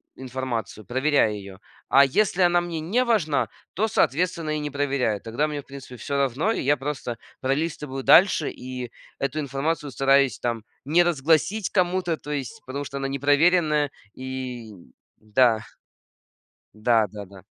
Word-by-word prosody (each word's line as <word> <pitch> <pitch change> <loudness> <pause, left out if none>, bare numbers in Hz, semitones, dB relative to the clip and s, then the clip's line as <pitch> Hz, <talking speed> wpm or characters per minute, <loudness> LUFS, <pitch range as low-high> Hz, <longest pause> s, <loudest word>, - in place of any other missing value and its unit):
информацию, 125 -5 -5
проверяю 130 -3 +2
ее. 100 -1 -10 0.3
А 140 - +7
если 190 +6 +1
она 175 0 +4
мне 170 -2 -4
не 210 +11 +1
важна, 195 - +1 0.3
то, 220 +5 +1
соответственно, 165 - 0
и - - -2
не 150 - -3
проверяю. 135 -7 0
Тогда 120 +7 -1
мне, 150 -1 -4
в - - -27
принципе, 135 -2 -10
всё 140 +3 -3
равно, 140 - +1
и - - -1
я 145 +2 +2
просто 135 -4 -4 0.2
пролистываю 135 -1 -2
дальше 180 -4 +5
и 125 -1 -7 0.3
эту 140 +3 -2
информацию 145 +1 -2
стараюсь 135 -2 +3
там 115 -2 -2 0.2
не 170 +5 +4
разгласить 170 +6 +1
кому-то, 180 -3 +1
то 150 - -8
есть 150 - -4
потому 140 +2 -5
что 140 - -6
она 135 0 -2
непроверенная. 145 +2 +2 0.2
И 130 -3 -6 0.5
да. 110 +1 +3 1.1
Да-да-да. 105 -4 -1
140 Hz, 145 wpm, -24 LUFS, 125-160 Hz, 1.1 s, А